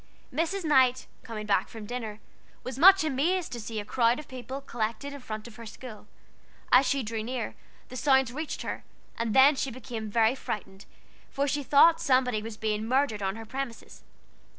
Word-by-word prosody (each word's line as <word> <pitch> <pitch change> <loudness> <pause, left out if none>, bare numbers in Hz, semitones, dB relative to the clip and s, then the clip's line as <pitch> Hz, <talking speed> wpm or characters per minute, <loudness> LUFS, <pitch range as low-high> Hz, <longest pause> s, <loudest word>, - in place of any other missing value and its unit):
Mrs. 335 +7 -1
Knight 260 -4 +4 0.2
coming 215 -2 -7
back 205 -1 +2
from 220 -2 -9
dinner, 220 -2 -5 0.4
was 255 +1 -6
much 385 +3 +8
amazed 315 +5 0
to 240 - -5
see 220 0 -5
a 205 - -6
crowd 235 +2 +2
of 300 - -9
people 260 +1 -7
collected 240 +1 -4
in 285 - -8
front 215 -3 -7
of 225 - -13
her 230 - -9
school. 220 -1 -10 0.6
As 255 +1 +6
she 270 +1 +1
drew 220 0 -3
near, 240 +1 -4 0.4
the 255 - -9
sounds 265 -1 +3
reached 310 +2 -4
her, - - -5 0.3
and 230 -2 -2
then 275 +3 +7
she 270 - -2
became 235 -3 -6
really 225 +2 +3
frightened, 200 -6 -6 0.4
for 280 +1 -1
she 290 +1 0
thought 295 +4 +5
somebody 255 -5 +2
was 220 0 -7
being 215 0 -2
murdered 255 -4 +1
on 195 0 -1
her 225 0 -8
premises. 260 0 -6
250 Hz, 185 wpm, -28 LUFS, 220-275 Hz, 0.6 s, much